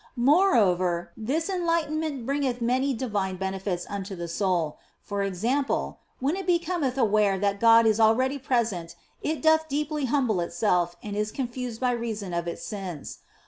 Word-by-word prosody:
Moreover, 210 Hz, -, +3 dB
this 270 Hz, +9 st, -2 dB
enlightenment 320 Hz, -7 st, -1 dB
bringeth 275 Hz, -2 st, -1 dB
many 255 Hz, +4 st, +1 dB
divine 205 Hz, -6 st, -2 dB
benefits 190 Hz, -1 st, -3 dB
unto 200 Hz, -1 st, -5 dB
the 170 Hz, -1 st, -5 dB
soul; 170 Hz, -3 st, -1 dB, 0.2 s
for 200 Hz, -1 st, -4 dB
example, 225 Hz, +9 st, -1 dB, 0.2 s
when 280 Hz, +6 st, 0 dB
it 385 Hz, -1 st, -5 dB
becometh 340 Hz, -6 st, 0 dB
aware 210 Hz, -5 st, +3 dB
that 200 Hz, +1 st, 0 dB
God 230 Hz, 0 st, +6 dB
is 220 Hz, 0 st, +3 dB
already 255 Hz, +5 st, +3 dB
present 225 Hz, -10 st, -1 dB, 0.3 s
it 310 Hz, +1 st, -2 dB
doth 315 Hz, 0 st, +4 dB
deeply 300 Hz, 0 st, -1 dB
humble 250 Hz, -7 st, +1 dB
itself 175 Hz, 0 st, 0 dB
and 205 Hz, -1 st, -5 dB
is 210 Hz, +1 st, -1 dB
confused 245 Hz, -2 st, -4 dB
by 250 Hz, -1 st, +2 dB
reason 220 Hz, -6 st, -3 dB
of 170 Hz, 0 st, -2 dB
its 170 Hz, -, -5 dB
sins. 190 Hz, -8 st, -6 dB
230 Hz, 150 wpm, -26 LUFS, 195-275 Hz, 0.3 s, God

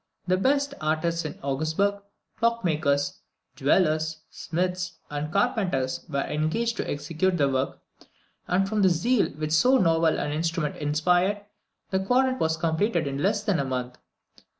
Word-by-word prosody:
The 185 Hz, 0 st, +2 dB
best 280 Hz, +8 st, +1 dB
artists 160 Hz, +2 st, 0 dB
in 155 Hz, -, -5 dB
Augsburg, 160 Hz, +9 st, 0 dB, 0.4 s
clockmakers, 160 Hz, -11 st, +1 dB, 0.4 s
jewellers, 155 Hz, +1 st, +1 dB
smiths, 180 Hz, +1 st, -2 dB, 0.2 s
and 150 Hz, +1 st, -3 dB
carpenters, 185 Hz, -, 0 dB
were 140 Hz, -2 st, 0 dB
engaged 170 Hz, +11 st, -1 dB
to -, -, -3 dB
execute 160 Hz, +5 st, -1 dB
the 140 Hz, -3 st, +3 dB
work, 130 Hz, 0 st, -1 dB, 0.7 s
and 195 Hz, +2 st, +2 dB
from 210 Hz, +1 st, 0 dB
the 190 Hz, -, +5 dB
zeal 205 Hz, +8 st, +2 dB
which 155 Hz, +1 st, -4 dB
so 250 Hz, +13 st, +5 dB
novel 165 Hz, -5 st, +3 dB
an 145 Hz, -, -2 dB
instrument 160 Hz, 0 st, -1 dB
inspired, 175 Hz, +7 st, +1 dB, 0.5 s
the 190 Hz, -, +2 dB
quadrant 255 Hz, +6 st, +2 dB
was 160 Hz, 0 st, +1 dB
completed 165 Hz, +2 st, 0 dB
in 140 Hz, 0 st, -3 dB
less 205 Hz, +4 st, +1 dB
than 200 Hz, -7 st, +1 dB
a -, -, +1 dB
month. 125 Hz, -1 st, -4 dB
165 Hz, 145 wpm, -26 LUFS, 150-200 Hz, 0.7 s, the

